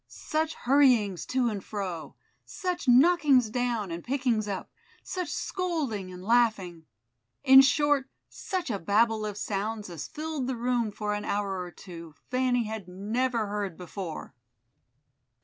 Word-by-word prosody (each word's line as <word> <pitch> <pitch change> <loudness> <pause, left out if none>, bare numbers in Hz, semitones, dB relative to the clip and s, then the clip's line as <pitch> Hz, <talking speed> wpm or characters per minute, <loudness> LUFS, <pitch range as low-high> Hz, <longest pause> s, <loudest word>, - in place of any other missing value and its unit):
Such 315 0 -2
hurryings 245 -8 +3
to 255 -1 +1
and 200 -3 -5
fro, 185 -6 -5 0.3
such 360 -5 -4
knockings 265 -3 +5
down 235 -5 -1
and 170 +1 -5
pickings 245 -5 0
up, 195 -2 -5 0.3
such 365 -4 -4
scolding 300 - -3
and 180 0 -10
laughing, 205 -8 +1 0.6
in 265 -1 +9
short 275 0 +2 0.2
such 365 -8 -4
a 200 - -2
Babel 215 +3 +2
of 205 -1 -6
sounds 210 0 -3
as 160 -4 -6
filled 305 -4 -4
the 260 -2 -2
room 240 -2 0
for 210 0 -3
an 205 0 -3
hour 200 -2 -2
or 180 - -6
two, 170 -4 -11 0.2
Fanny 250 -1 +2
had 215 -3 -6
never 220 +5 -1
heard 200 -4 -4
before. 180 -1 -7
225 Hz, 140 wpm, -28 LUFS, 195-265 Hz, 0.6 s, in